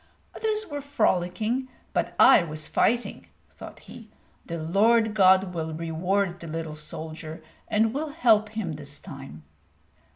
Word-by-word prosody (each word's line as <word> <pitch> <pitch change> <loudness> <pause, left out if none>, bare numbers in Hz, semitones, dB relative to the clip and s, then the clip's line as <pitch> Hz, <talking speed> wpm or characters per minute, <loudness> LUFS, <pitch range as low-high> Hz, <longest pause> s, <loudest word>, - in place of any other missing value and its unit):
"Others 435 -1 -1
were 290 -5 -5
frolicking, 225 -1 0 0.3
but - - -1
I - - +8
was 155 -1 -4
fighting," 240 +2 0 0.2
thought - - -11
he. 225 -2 -13 0.4
"The 170 - -4
Lord 215 +7 +3
God 190 -2 +4
will 160 -2 -3
reward 175 +3 -1
the 170 - -9
little 160 0 -4
soldier, 155 +1 -8 0.2
and 220 +1 +2
will 300 +3 -2
help 225 -8 +3
him 210 -6 -4
this 145 -1 -8
time." 135 - -10
185 Hz, 135 wpm, -26 LUFS, 160-225 Hz, 0.4 s, I